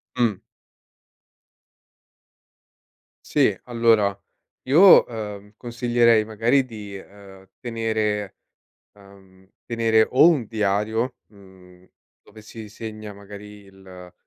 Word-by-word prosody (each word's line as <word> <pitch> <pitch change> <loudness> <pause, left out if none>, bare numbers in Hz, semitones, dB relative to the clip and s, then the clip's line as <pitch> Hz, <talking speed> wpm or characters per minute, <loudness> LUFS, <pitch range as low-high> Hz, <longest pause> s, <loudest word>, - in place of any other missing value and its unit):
Mh. 115 -6 0 2.8
Sì, - - +1
allora 115 -5 +1 0.4
io, 170 +9 +6
ehm, 105 -3 -8
consiglierei 120 -2 +1
magari 115 +5 +1
di, 105 -5 -10
ehm, 95 -1 -16
tenere, 110 -4 -3 0.6
uhm, 95 -2 -20 0.2
tenere 115 -1 +1
o 130 +5 +5
un 150 -8 +1
diario, 110 +3 -2
mhmm, 95 -3 -19 0.3
dove 110 +1 -17
si 110 0 -11
segna 110 -1 -9
magari 105 +1 -13
il 95 -2 -15
105 Hz, 90 wpm, -22 LUFS, 100-115 Hz, 2.8 s, io